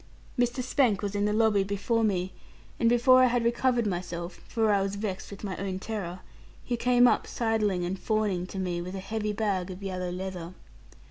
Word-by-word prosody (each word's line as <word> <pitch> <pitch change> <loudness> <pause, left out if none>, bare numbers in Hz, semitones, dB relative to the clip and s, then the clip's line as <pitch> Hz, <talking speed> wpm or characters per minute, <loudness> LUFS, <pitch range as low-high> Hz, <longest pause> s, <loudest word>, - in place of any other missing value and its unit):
Mr. 245 +1 0
Spank 245 -6 +2
was 200 -1 -2
in 205 0 +1
the 210 - +1
lobby 215 -2 +3
before 200 +4 0
me, 185 -3 0 0.5
and 230 - +4
before 255 +2 +6
I 255 - +6
had 245 -1 +1
recovered 240 0 +2
myself 175 -2 -4
for 220 -2 +1
I 200 -1 +3
was 195 +1 -2
vexed 200 -2 -4
with 200 +1 -10
my 195 -3 -3
own 190 0 -3
terror 190 -3 -5 0.4
he 245 - -1
came 245 +1 +4
up - - +2
sidling 215 -6 0
and 185 +2 -3
fawning 205 -5 0
to 195 - -8
me, 180 -2 -2
with 180 +2 -6
a - - -4
heavy 210 +2 -2
bag 200 -4 -1
of 185 +2 -8
yellow 185 -2 -3
leather. 180 -1 -5
200 Hz, 200 wpm, -28 LUFS, 185-230 Hz, 0.5 s, before